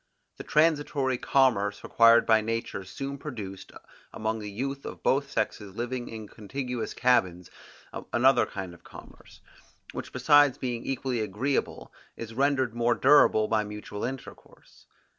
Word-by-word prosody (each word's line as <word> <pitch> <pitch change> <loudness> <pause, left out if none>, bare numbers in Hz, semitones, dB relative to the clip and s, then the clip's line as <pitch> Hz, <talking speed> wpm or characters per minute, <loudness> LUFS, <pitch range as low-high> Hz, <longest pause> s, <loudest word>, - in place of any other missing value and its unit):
The - - -7
transitory 145 -4 +1
commerce 105 -7 +1
required 115 0 +5
by 110 -1 +4
nature 115 -2 -3
soon 135 +9 -6
produced, 100 -10 -8 0.4
among 110 +1 -3
the 105 -1 -6
youth 135 +6 -4
of - - -9
both 140 +1 +1
sexes 105 -4 -3
living 120 +1 -4
in 110 -2 -8
contiguous 125 +3 -5
cabins, 95 -9 +1 0.6
another 130 +3 +4
kind 95 -3 -7
of 90 - -17
commerce, - - -15 0.5
which - - -7
besides 145 +1 +4
being 120 -2 -4
equally 130 -2 -2
agreeable 110 +7 -2 0.2
is 115 -1 -7
rendered 130 -1 +1
more 120 0 +1
durable 130 -6 +5
by 110 -1 +1
mutual 105 0 -7
intercourse. 130 +2 -9
120 Hz, 135 wpm, -27 LUFS, 105-135 Hz, 0.6 s, required